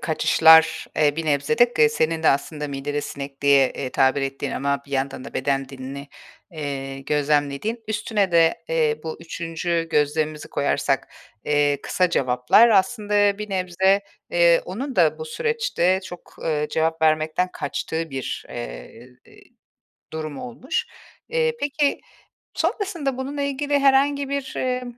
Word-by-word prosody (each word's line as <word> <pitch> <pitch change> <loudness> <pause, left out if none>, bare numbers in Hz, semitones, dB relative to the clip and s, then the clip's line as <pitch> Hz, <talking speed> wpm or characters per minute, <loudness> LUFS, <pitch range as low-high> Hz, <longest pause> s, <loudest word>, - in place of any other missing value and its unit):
kaçışlar, 160 0 +5
eee, 150 -1 +2
bir 165 - -2
nebze 145 +10 0
de, 240 0 +5
k 150 -9 +4
senin 160 +2 -1
de - - +4
aslında 150 +1 -1
"midede 145 +1 -3
sinek" 140 -1 -7
diye, 140 -2 +5
eee, 130 -2 -5
tabir 135 +1 +2
ettiğin 135 0 -3
ama 140 0 -1
bir - - -17
yandan 135 -1 -2
da - - -10
beden 135 0 -1
dilini, 135 +1 -8 0.4
eee, 135 -3 -5
gözlemlediğin; 145 - 0
üstüne 210 -3 -1
de, 165 0 +3
eee, 155 -2 +1
bu 160 - -4
3’üncü 165 0 -3
gözlemimizi 150 0 0
koyarsak, 140 - 0 0.4
eee, 145 -1 +2
kısa 180 -2 +1
cevaplar... 125 - +4
Aslında 205 0 +2
bir 210 0 -6
nebze, 190 +1 +2 0.3
eee, 170 -1 +4
onun 255 +9 -5
da - - +3
bu 470 - -5
süreçte 460 - 0
çok, 175 -1 -11
eee, 150 -2 0
cevap 160 +1 0
vermekten 155 +3 +2
kaçtığı 160 +3 -4
bir, 135 -2 -5
eee, - - -8 1.1
durum 155 -2 -5
olmuş. 250 +4 -3 0.4
Eee, 475 0 +1
peki, 285 0 0 0.5
sonrasında 340 - -2
bununla 280 +2 -4
ilgili 285 +1 0
herhangi 275 0 +3
bir, 280 -1 -3
eee, 255 0 -1
160 Hz, 140 wpm, -23 LUFS, 145-225 Hz, 1.1 s, kaçışlar